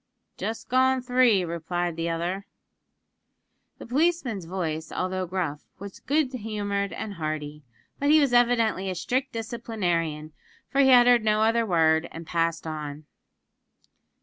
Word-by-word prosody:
"Just 225 Hz, +1 st, -5 dB
gone 260 Hz, 0 st, +2 dB
three," 245 Hz, -7 st, +3 dB
replied 170 Hz, +1 st, -3 dB
the 165 Hz, +1 st, -2 dB
other. 175 Hz, +4 st, -3 dB, 1.3 s
The -, -, -10 dB
policeman's 260 Hz, -, 0 dB
voice, 160 Hz, -3 st, -4 dB
although 185 Hz, 0 st, -2 dB
gruff, 165 Hz, -5 st, -3 dB
was 200 Hz, 0 st, -9 dB
good 285 Hz, -2 st, 0 dB
humoured 205 Hz, -4 st, -3 dB
and 210 Hz, -, -5 dB
hearty; 155 Hz, -3 st, -4 dB, 0.4 s
but 285 Hz, -, +1 dB
he 310 Hz, +1 st, +7 dB
was 280 Hz, -4 st, +2 dB
evidently 230 Hz, -5 st, +2 dB
a 185 Hz, -, -3 dB
strict 260 Hz, +9 st, -1 dB
disciplinarian, 180 Hz, -10 st, -3 dB, 0.4 s
for 275 Hz, -, +3 dB
he 265 Hz, -, +5 dB
uttered 245 Hz, -2 st, +6 dB
no 215 Hz, 0 st, +2 dB
other 230 Hz, +1 st, +2 dB
word, 160 Hz, -2 st, +2 dB
and 165 Hz, 0 st, -8 dB
passed 165 Hz, 0 st, -1 dB
on. 150 Hz, -1 st, -6 dB
200 Hz, 135 wpm, -26 LUFS, 165-240 Hz, 1.3 s, he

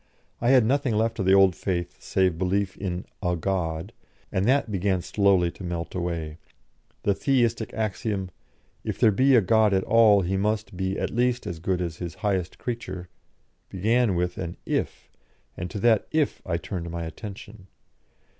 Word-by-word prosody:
I 120 Hz, -, +2 dB
had 130 Hz, -4 st, +6 dB
nothing 135 Hz, -1 st, +1 dB
left 115 Hz, +1 st, 0 dB
of 95 Hz, -, 0 dB
the 95 Hz, -, +6 dB
old 95 Hz, -2 st, +5 dB
faith 90 Hz, -2 st, -3 dB
save 90 Hz, -3 st, +1 dB
belief 95 Hz, +1 st, 0 dB
in 90 Hz, -2 st, -4 dB, 0.2 s
"a 90 Hz, -2 st, 0 dB
God," 85 Hz, +1 st, -2 dB, 0.4 s
and 95 Hz, +1 st, 0 dB
that 130 Hz, -2 st, +2 dB
began 95 Hz, -2 st, 0 dB
slowly 95 Hz, -4 st, +2 dB
to 95 Hz, -, -11 dB
melt 85 Hz, -1 st, -4 dB
away. 85 Hz, -3 st, -3 dB, 0.6 s
The 100 Hz, -, +3 dB
Theistic 115 Hz, -2 st, +1 dB
axiom: 105 Hz, -3 st, -2 dB, 0.5 s
"If -, -, -3 dB
there 115 Hz, -3 st, +5 dB
be 130 Hz, +6 st, +4 dB
a 120 Hz, -, +6 dB
God 105 Hz, +1 st, +3 dB
at 95 Hz, -, +1 dB
all 110 Hz, -3 st, +5 dB
He 95 Hz, +2 st, -1 dB
must 105 Hz, 0 st, -1 dB
be 95 Hz, +1 st, -2 dB
at -, -, -2 dB
least 125 Hz, +1 st, +1 dB
as 85 Hz, -2 st, -5 dB
good 90 Hz, +1 st, -1 dB
as 85 Hz, -2 st, -3 dB
His 85 Hz, -3 st, -6 dB
highest 95 Hz, -3 st, -1 dB
creature," 95 Hz, -7 st, -5 dB, 0.6 s
began 110 Hz, +2 st, +2 dB
with 90 Hz, 0 st, -1 dB
an 85 Hz, -1 st, -5 dB
"if," -, -, -3 dB, 0.4 s
and 90 Hz, +1 st, -5 dB
to 105 Hz, -, -6 dB
that 115 Hz, -2 st, +3 dB
"if" 155 Hz, -2 st, 0 dB
I 85 Hz, -2 st, 0 dB
turned 85 Hz, -1 st, -5 dB
my 85 Hz, 0 st, -4 dB
attention. 100 Hz, +4 st, -9 dB
95 Hz, 175 wpm, -25 LUFS, 90-110 Hz, 0.6 s, had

